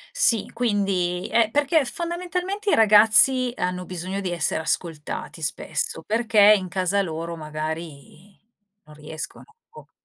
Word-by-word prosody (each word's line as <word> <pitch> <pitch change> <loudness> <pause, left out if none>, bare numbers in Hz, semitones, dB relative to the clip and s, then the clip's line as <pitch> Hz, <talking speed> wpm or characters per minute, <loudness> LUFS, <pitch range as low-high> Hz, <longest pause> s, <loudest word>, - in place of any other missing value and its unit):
Sì, 235 - +3
quindi 195 -6 -1
è 225 -2 +3
perché 290 +2 +1
fondamentalmente 360 - -4
i - - +4
ragazzi, 225 +4 +5
hanno 180 0 -3
bisogno 185 +2 -5
di 185 -2 -4
essere 170 -1 0
ascoltati 160 -2 -4
spesso, 475 -2 -2
perché 215 -2 +4
in 185 -2 -6
casa 185 +2 0
loro 165 0 -5
magari, 155 +3 -8 0.5
non 150 0 -16
riescono, 155 +1 -8 0.2
boh. 465 - -16
200 Hz, 125 wpm, -23 LUFS, 170-245 Hz, 0.5 s, ragazzi